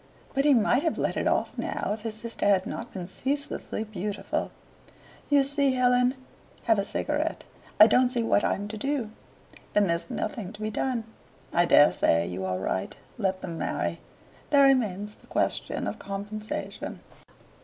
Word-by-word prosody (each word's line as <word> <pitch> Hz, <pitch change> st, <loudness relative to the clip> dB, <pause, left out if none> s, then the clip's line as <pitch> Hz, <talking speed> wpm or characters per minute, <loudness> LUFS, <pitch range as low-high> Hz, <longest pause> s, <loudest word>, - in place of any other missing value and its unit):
But 275 Hz, 0 st, +1 dB
he 290 Hz, -2 st, +6 dB
might 240 Hz, +3 st, +3 dB
have 325 Hz, 0 st, 0 dB
let -, -, 0 dB
it -, -, 0 dB
off -, -, 0 dB
now -, -, -2 dB
if 215 Hz, -, -6 dB
his 220 Hz, -1 st, -4 dB
sister 230 Hz, -1 st, -2 dB
had 195 Hz, -2 st, +4 dB
not 230 Hz, -, -6 dB
been 180 Hz, -3 st, -6 dB
ceaselessly 270 Hz, +1 st, -3 dB
beautiful. 205 Hz, -1 st, -3 dB, 0.8 s
"You 285 Hz, -1 st, +5 dB
see, 280 Hz, -1 st, +3 dB
Helen 250 Hz, 0 st, +3 dB, 0.5 s
have 225 Hz, -3 st, +3 dB
a 200 Hz, -, 0 dB
cigarette 300 Hz, +8 st, -2 dB, 0.4 s
I 215 Hz, -, +12 dB
don't 250 Hz, +3 st, +4 dB
see 245 Hz, -2 st, 0 dB
what 225 Hz, -, +2 dB
I'm 205 Hz, +1 st, 0 dB
to 215 Hz, -, -5 dB
do." 265 Hz, -2 st, -2 dB, 0.6 s
"Then 210 Hz, -, +4 dB
there's 170 Hz, +3 st, -1 dB
nothing 225 Hz, -5 st, -4 dB
to 210 Hz, -, -11 dB
be 215 Hz, 0 st, -2 dB
done. 245 Hz, +1 st, -1 dB, 0.5 s
I 175 Hz, 0 st, +4 dB
dare 150 Hz, -3 st, +7 dB
say 85 Hz, +1 st, +2 dB
you 95 Hz, +2 st, -4 dB
are 95 Hz, 0 st, -1 dB
right. 95 Hz, 0 st, -2 dB, 0.2 s
Let 190 Hz, -3 st, 0 dB
them 170 Hz, -3 st, -5 dB
marry. -, -, -2 dB, 0.5 s
There 285 Hz, -2 st, +6 dB
remains 210 Hz, -6 st, +2 dB
the -, -, -23 dB
question -, -, -1 dB
of -, -, -4 dB
compensation. 205 Hz, +2 st, -5 dB
215 Hz, 170 wpm, -27 LUFS, 195-260 Hz, 0.8 s, I